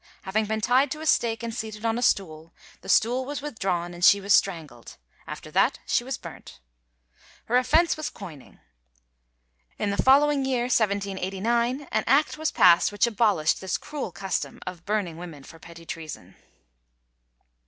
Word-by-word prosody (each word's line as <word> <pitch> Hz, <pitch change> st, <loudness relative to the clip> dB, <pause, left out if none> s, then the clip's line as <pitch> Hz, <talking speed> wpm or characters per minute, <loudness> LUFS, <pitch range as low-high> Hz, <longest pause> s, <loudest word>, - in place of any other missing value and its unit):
Having 210 Hz, +3 st, 0 dB
been 220 Hz, +1 st, -2 dB
tied 255 Hz, +5 st, +3 dB
to 305 Hz, +3 st, -6 dB
a -, -, -6 dB
stake 235 Hz, -6 st, +1 dB
and 230 Hz, -1 st, -4 dB
seated 220 Hz, -1 st, -6 dB
on 225 Hz, 0 st, +1 dB
a 240 Hz, -, -3 dB
stool, 165 Hz, -8 st, -1 dB, 0.3 s
the -, -, -11 dB
stool 245 Hz, +4 st, +3 dB
was 285 Hz, +2 st, -5 dB
withdrawn 185 Hz, -10 st, -3 dB
and 175 Hz, 0 st, -8 dB
she 200 Hz, +1 st, +7 dB
was 200 Hz, 0 st, +1 dB
strangled. 155 Hz, -11 st, -1 dB, 0.3 s
After -, -, -8 dB
that -, -, +2 dB
she -, -, +1 dB
was -, -, -4 dB
burnt. -, -, -12 dB, 0.9 s
Her 240 Hz, -, -1 dB
offence 310 Hz, +7 st, +3 dB
was 310 Hz, -1 st, -4 dB
coining. 165 Hz, -, -12 dB, 1.2 s
In 205 Hz, -, -1 dB
the 200 Hz, -, 0 dB
following 280 Hz, +1 st, +4 dB
year, 260 Hz, -2 st, 0 dB
1789, 220 Hz, +4 st, -1 dB
an -, -, 0 dB
act 285 Hz, +5 st, +3 dB
was 315 Hz, -, 0 dB
passed 175 Hz, 0 st, +5 dB
which 205 Hz, +1 st, +2 dB
abolished 210 Hz, -8 st, +1 dB
this 190 Hz, -1 st, -2 dB
cruel 290 Hz, -10 st, -6 dB
custom 190 Hz, 0 st, -4 dB
of 180 Hz, -2 st, -8 dB
burning 200 Hz, -6 st, -2 dB
women 165 Hz, -5 st, -9 dB
for 165 Hz, -, -14 dB
petty 170 Hz, 0 st, -13 dB
treason. 155 Hz, -, -8 dB
210 Hz, 165 wpm, -25 LUFS, 175-245 Hz, 1.2 s, she